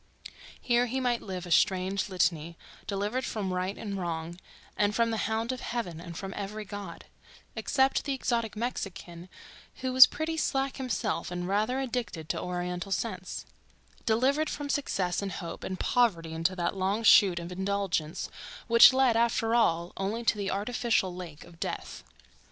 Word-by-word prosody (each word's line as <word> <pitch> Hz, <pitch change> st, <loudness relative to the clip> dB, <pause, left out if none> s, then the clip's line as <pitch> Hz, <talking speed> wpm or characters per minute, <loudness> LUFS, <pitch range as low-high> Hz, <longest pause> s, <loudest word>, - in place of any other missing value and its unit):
Here 240 Hz, 0 st, +2 dB
he 260 Hz, +3 st, -2 dB
might 245 Hz, -2 st, 0 dB
live 185 Hz, -2 st, -6 dB
a 175 Hz, -, -8 dB
strange 190 Hz, +3 st, +2 dB
litany, 170 Hz, -3 st, 0 dB, 0.3 s
delivered 205 Hz, +6 st, -1 dB
from 200 Hz, -5 st, -3 dB
right 185 Hz, +2 st, -2 dB
and 200 Hz, -2 st, -4 dB
wrong 170 Hz, 0 st, -4 dB, 0.4 s
and 205 Hz, 0 st, +1 dB
from 230 Hz, -1 st, +2 dB
the 220 Hz, -2 st, -1 dB
hound 225 Hz, +2 st, -1 dB
of 255 Hz, -, -4 dB
heaven 185 Hz, -9 st, -4 dB
and 170 Hz, -1 st, -8 dB
from 195 Hz, -1 st, -5 dB
every 210 Hz, +2 st, -5 dB
God 200 Hz, -4 st, -8 dB, 0.5 s
(except 265 Hz, -1 st, +2 dB
the 280 Hz, -, 0 dB
exotic 230 Hz, -4 st, -1 dB
Mexican 195 Hz, -7 st, -4 dB
one 175 Hz, +2 st, -12 dB, 0.5 s
who 260 Hz, -1 st, -1 dB
was 255 Hz, 0 st, +11 dB
pretty 320 Hz, +1 st, -3 dB
slack 270 Hz, -3 st, 0 dB
himself 250 Hz, -4 st, -2 dB
and 180 Hz, 0 st, -4 dB
rather 215 Hz, +7 st, +1 dB
addicted 240 Hz, -, -4 dB
to -, -, -1 dB
Oriental 180 Hz, +1 st, -3 dB
scents)—delivered 260 Hz, +8 st, -2 dB
from 290 Hz, -1 st, -5 dB
success 195 Hz, -12 st, 0 dB
and 195 Hz, -2 st, -4 dB
hope 170 Hz, 0 st, -6 dB
and 185 Hz, -1 st, -4 dB
poverty 175 Hz, -10 st, +1 dB
into 165 Hz, +3 st, 0 dB
that 175 Hz, +1 st, -1 dB
long 195 Hz, +4 st, 0 dB
chute 195 Hz, -4 st, +7 dB
of 170 Hz, +1 st, -5 dB
indulgence 190 Hz, -4 st, -1 dB, 0.4 s
which 235 Hz, +3 st, +8 dB
led, 260 Hz, -3 st, +4 dB
after 230 Hz, -1 st, +2 dB
all, 170 Hz, -7 st, +2 dB
only 205 Hz, +5 st, -2 dB
to 225 Hz, 0 st, +3 dB
the 200 Hz, -2 st, -2 dB
artificial 215 Hz, -2 st, 0 dB
lake 170 Hz, -5 st, -8 dB
of 170 Hz, -1 st, -16 dB
death. -, -, -5 dB
200 Hz, 165 wpm, -29 LUFS, 180-235 Hz, 0.5 s, was